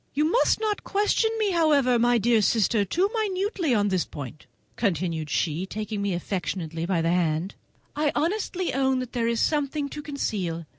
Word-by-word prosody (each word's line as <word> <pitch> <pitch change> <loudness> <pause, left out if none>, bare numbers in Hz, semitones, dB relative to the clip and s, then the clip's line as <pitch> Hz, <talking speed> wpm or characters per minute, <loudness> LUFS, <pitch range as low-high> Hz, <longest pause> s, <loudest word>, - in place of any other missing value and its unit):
You 300 +2 +2
must 485 - +3
not 430 -2 -1
question 420 +2 +1
me, 425 -3 +1
however, 290 -8 +3
my 240 +1 +4
dear 230 0 +3
sister, 215 0 +2
too 350 - +1
minutely 395 - -1
on 205 -1 +2
this 185 -2 +1
point," 145 0 -9 0.3
continued 170 -6 -1
she, 165 +5 -1
taking 215 0 -4
me 200 -3 0
affectionately 170 -2 -3
by 175 -3 +1
the 165 - +2
hand; 170 +1 0 0.4
"I 295 -1 +1
honestly 365 +1 -1
own 265 0 +2
that 255 -1 -5
there 235 -2 0
is 230 -1 0
something 290 -1 0
to 300 - -6
conceal. 195 - -3
235 Hz, 170 wpm, -25 LUFS, -, 0.4 s, my